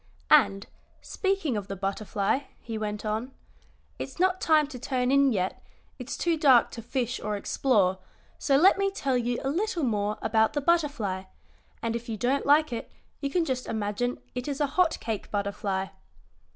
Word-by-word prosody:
"And, 205 -10 +5 0.4
speaking 385 - -1
of 205 -2 -3
the 195 - -4
butterfly," 200 +6 -1
he 225 - -6
went 210 -1 -4
on, 220 +5 -2 0.7
"it's - - -6
not 370 0 +2
time 310 -2 +4
to 255 -4 -8
turn 255 0 0
in 275 -1 +5
yet, 190 -4 -1 0.4
it's 250 +1 -5
too 340 -2 +1
dark 265 -6 +5
to 230 - -7
fish 245 0 -2
or 210 -1 -2
explore, 200 -4 +1 0.4
so 275 -2 +3
let 380 +6 +5
me 395 0 +2
tell 275 -10 -1
you 245 0 0
a 270 - 0
little 360 0 -1
more 210 -3 0
about 220 0 +2
the 295 - 0
butterfly, 280 - 0 0.6
and 230 0 -1
if 235 +1 -5
you 220 - -3
don't 260 +6 0
like 295 -1 +4
it 230 - -5 0.3
you 280 - -2
can 340 +3 +1
just 255 -3 -2
imagine 220 +3 -2 0.2
it 250 +1 -4
is 280 -2 -3
a 295 - +3
hot 360 -3 +3
cake 220 -3 -4
butterfly." 200 -1 -2
245 Hz, 180 wpm, -27 LUFS, 210-290 Hz, 0.7 s, And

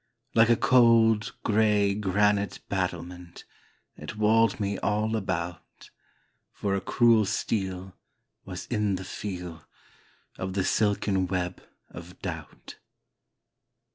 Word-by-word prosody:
Like 115 0 +5
a 120 - +6
cold, 115 -3 +4
gray 105 -2 +3
granite 100 0 +1
battlement 90 -2 -4 0.5
It - - -8
walled 110 +2 +3
me 100 -1 -2
all 110 +2 0
about, 90 -4 -5 0.6
For 100 -1 -2
a 100 - 0
cruel 115 +2 +4
steel, 95 -2 -3 0.5
Was 90 -1 -7
in 105 -4 0
the 95 - -6
feel 90 -6 -6 0.8
Of 95 0 -3
the 95 -1 0
silken 100 -2 +1
web 90 0 -3 0.3
of - - -11
doubt. - - -7
100 Hz, 110 wpm, -27 LUFS, 95-110 Hz, 0.8 s, a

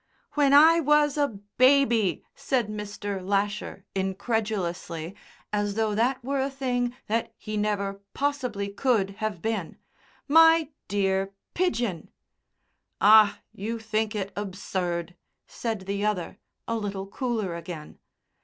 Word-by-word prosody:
"When 285 -2 +3
I 320 +4 +8
was 295 -1 +3
a 290 -1 +2 0.3
baby," 255 -6 +4
said 245 -5 -1
Mr. 205 -2 -5
Lasher, 200 0 -2
incredulously, 190 -4 -2 0.4
as 205 -1 0
though 220 -1 +1
that 245 +4 +1
were 275 +1 -1
a 270 - 0
thing 250 -3 -1
that 225 +2 -1
he 215 -1 -6
never 200 -1 -1
possibly 255 -8 -1
could 200 -2 +1
have 215 -6 -3
been, 215 -6 -2 0.5
"my 325 0 +6 0.2
dear 195 0 0 0.2
Pidgen!" 240 - -1 0.9
"Ah, 210 0 +6
you 225 +4 -4
think 220 0 -1
it 200 -1 -3
absurd," 180 -3 -3 0.3
said 225 -4 -4
the 200 +1 -3
other, 210 -5 -2 0.3
a 230 - -1
little 200 -2 -4
cooler 220 -3 -2
again. 170 -3 -8
210 Hz, 120 wpm, -26 LUFS, 195-250 Hz, 0.9 s, I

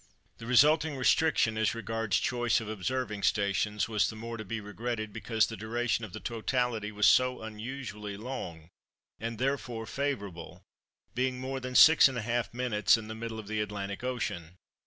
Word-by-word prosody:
The 115 - -8
resulting 150 +4 +4
restriction 125 -4 +3
as 110 +1 +1
regards 115 -2 -1
choice 120 -1 +1
of 110 - -7
observing 110 +1 -3
stations 105 +1 +1
was 110 -2 +1
the 110 - -7
more 115 +1 -6
to 110 - -6
be 115 +2 -4
regretted 110 +1 -4
because 110 0 +1
the 115 - -6
duration 115 +1 -1
of 110 - -6
the - - -7
totality 115 -2 -1
was 105 0 +3
so 130 0 +4
unusually 110 -2 -6
long, 90 -9 -7 0.5
and 115 +1 -4
therefore 125 -3 -2
favourable, 105 -12 -4 0.5
being 125 +1 -1
more 135 +1 -3
than 130 0 -6
6½ 120 -7 +5
minutes 115 -5 +2
in 110 -1 -8
the - - -4
middle 110 0 -6
of 110 -2 -8
the 110 0 -1
Atlantic 100 0 -4
Ocean. 90 -9 -3
115 Hz, 160 wpm, -30 LUFS, 105-125 Hz, 0.5 s, 6½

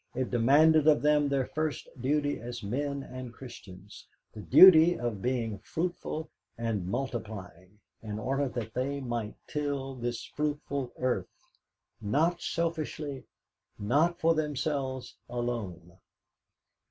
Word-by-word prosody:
It 130 0 -2
demanded 145 +6 +5
of 150 -2 +5
them 150 -1 +4
their 135 -2 +1
first 155 -1 -3
duty 145 +2 +1
as 120 0 -7
men 140 +6 -2
and 130 -2 -8
Christians, 100 - -12 0.3
the - - -9
duty 175 - +8
of 120 -5 -3
being 115 -4 -1
fruitful 160 - -3 0.3
and 110 -6 -2
multiplying, 105 -5 -5 0.2
in 105 -2 -5
order 135 +4 -1
that 110 -3 -5
they 140 +3 -1
might 120 -5 -3
till 140 -2 -3
this 120 -2 -4
fruitful 145 -3 -3
earth, 125 -8 -1 0.7
not 160 +11 +1
selfishly, 155 -5 -3 0.5
not 150 +12 +2
for 165 +1 +4
themselves 140 -4 -2
alone. 110 -8 -4
130 Hz, 115 wpm, -29 LUFS, 115-150 Hz, 0.7 s, duty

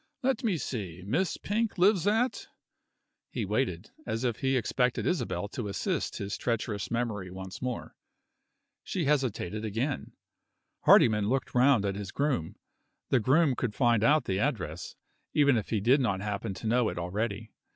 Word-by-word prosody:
Let 265 +1 +1
me 205 -7 +1
see: 95 - -5
Miss 165 - 0
Pink 220 +1 -1
lives 190 0 +4
at 225 +5 +1 0.4
?" - - -54
He - - 0
waited, - - -1 0.2
as 115 - -2
if 120 -3 0
he 135 0 +1
expected 125 +2 0
Isabel 100 - -1
to 115 -1 -4
assist 100 - -2
his 100 0 -4
treacherous 110 -4 -2
memory 110 -6 -2
once 95 +1 -8
more. 125 -2 -4 0.9
She 175 -5 -2
hesitated 120 -8 0
again. 115 +6 -2 0.7
Hardyman 105 -2 +6
looked 135 +2 -1
round 125 -4 +4
at 100 - 0
his 100 -1 -6
groom. 140 - -1 0.5
The 130 - +4
groom 140 +5 +3
could 115 -5 -2
find 120 -4 +3
out 150 +5 +4
the 95 0 -1
address, 90 - -2 0.4
even 140 -3 +5
if 110 - -2
he 110 - +1
did 125 +8 +4
not 105 -6 0
happen 100 -2 -3
to 105 - -9
know 120 +1 +2
it - - -6
already. 105 +5 -3
115 Hz, 160 wpm, -29 LUFS, 100-140 Hz, 0.9 s, Hardyman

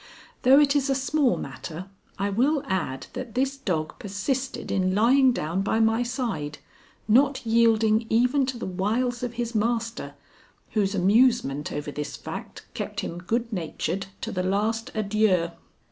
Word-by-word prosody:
Though 265 +3 +7
it 290 -1 +4
is 280 -1 +2
a 270 - +2
small 275 0 +1
matter, 170 +2 -7 0.3
I 200 0 -1
will 270 +8 +2
add 170 -9 -2
that 245 -3 -6
this 270 +2 +1
dog 170 -12 -3
persisted 250 +7 -3
in 185 -1 +1
lying 255 +5 +5
down 175 -4 -2
by 215 +3 0
my 225 +1 +3
side, 235 - -3 0.5
not 260 +4 +3
yielding 225 -1 +3
even 250 +4 +3
to 260 -2 -3
the - - -5
wiles 220 +7 -1
of 245 -1 -3
his 235 0 -3
master, 230 +1 -1 0.6
whose 200 -2 +1
amusement 195 - +3
over 145 0 -4
this 145 0 -5
fact - - -8
kept - - -4
him 170 - -5
good 230 +6 -2
natured 175 +1 -3
to - - -4
the 185 - -1
last 210 +4 0
adieu. 200 -5 +2
225 Hz, 155 wpm, -25 LUFS, 190-250 Hz, 0.6 s, Though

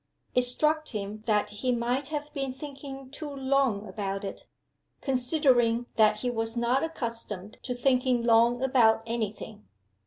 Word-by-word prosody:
It 250 - +4
struck 305 +5 +1
him 210 -1 -5
that 210 -1 +2
he 255 - +2
might 245 +3 0
have 295 0 -5
been 270 -3 -2
thinking 270 -1 -9
too 295 +1 -6
long 265 -6 +1
about 195 0 -3
it 195 - -7 0.5
considering 250 -3 +2
that 215 -1 +4
he 245 - 0
was 225 0 -2
not 240 +3 +2
accustomed 230 - -5
to 250 - -4
thinking 250 -1 +2
long 235 +2 +4
about 235 -4 +4
any 225 -3 -1
thing. 210 0 -11
245 Hz, 150 wpm, -28 LUFS, 225-270 Hz, 0.5 s, It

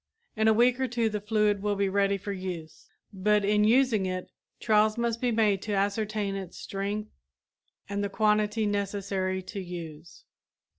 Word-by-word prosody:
In 220 0 +2
a 220 - +6
week 245 +3 +3
or 260 - +1
two 235 -2 0
the 210 -1 -3
fluid 210 -1 +1
will 205 0 0
be 200 0 +1
ready 200 0 +1
for 200 +1 -6
use, 175 -4 -7 0.2
but 205 +1 +2
in 210 +1 +3
using 225 -3 +3
it, 185 0 -4 0.3
trials 215 0 +3
must 235 -1 -1
be 250 - +2
made 215 -4 +2
to 210 - -3
ascertain 205 +1 -1
its 190 -3 -7
strength 200 +2 -4 0.8
and 200 0 -2
the 200 - -1
quantity 210 +1 +1
necessary 195 -2 -2
to 200 +2 -6
use. 170 -3 -8
205 Hz, 165 wpm, -28 LUFS, 195-215 Hz, 0.8 s, a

